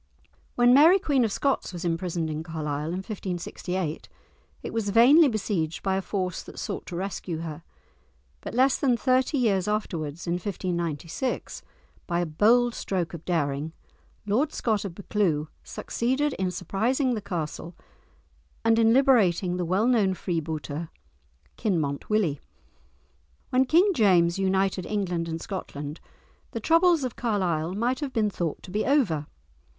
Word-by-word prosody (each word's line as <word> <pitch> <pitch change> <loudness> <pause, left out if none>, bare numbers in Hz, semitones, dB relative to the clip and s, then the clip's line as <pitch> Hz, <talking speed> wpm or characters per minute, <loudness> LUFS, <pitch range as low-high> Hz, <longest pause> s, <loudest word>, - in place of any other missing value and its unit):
When 245 0 +5
Mary 320 +8 +7
Queen 285 -9 +1
of 220 - 0
Scots 275 0 0
was 175 -1 -6
imprisoned 170 -1 -1
in 155 0 -3
Carlisle 155 -2 -4
in 180 +3 -3
1568 180 -4 -4 0.5
it - - -6
was 225 -3 -1
vainly 260 +10 +7
besieged 195 - -2
by 190 -1 +1
a 190 - 0
force 185 -3 -3
that - - -12
sought - - -5
to 175 - -6
rescue 180 -3 -4
her; 160 -1 -6 0.8
but - - -7
less 260 +2 +3
than 255 -4 +2
thirty 260 +3 +2
years 205 -7 +1
afterwards, 170 -7 -3
in 170 - -1
1596, 175 - -3 0.5
by 170 -1 0
a 175 - +1
bold 230 +9 +3
stroke 180 -7 -3
of 170 -1 -7
daring, 155 -2 -1 0.5
Lord 250 +9 +1
Scott 215 -3 -1
of 180 -4 -6
Buccleuch 175 -7 0
succeeded 265 +5 -1
in 190 -1 +1
surprising 230 - 0
the 220 - -3
castle 170 -2 -5 0.9
and 225 0 +4
in 225 0 +5
liberating 200 -10 +3
the 180 - -1
well 190 +6 +1
known 215 -7 +3
freebooter, 160 -2 -4 0.7
"Kinmont 155 -9 -1
Willie." 190 -10 +1 1.1
When 255 +1 +4
King 355 +9 +4
James 180 - +3
united 190 -1 +1
England 180 -5 -1
and 165 0 -4
Scotland, 150 -6 -6 0.5
the - - -2
troubles 335 -2 +4
of 250 -2 -3
Carlisle 185 -7 -1
might 240 +5 0
have 285 -4 -4
been 215 -3 +1
thought 170 -5 -3
to 180 - -10
be 210 +3 0
over. 200 - +1
190 Hz, 145 wpm, -26 LUFS, 170-235 Hz, 1.1 s, Mary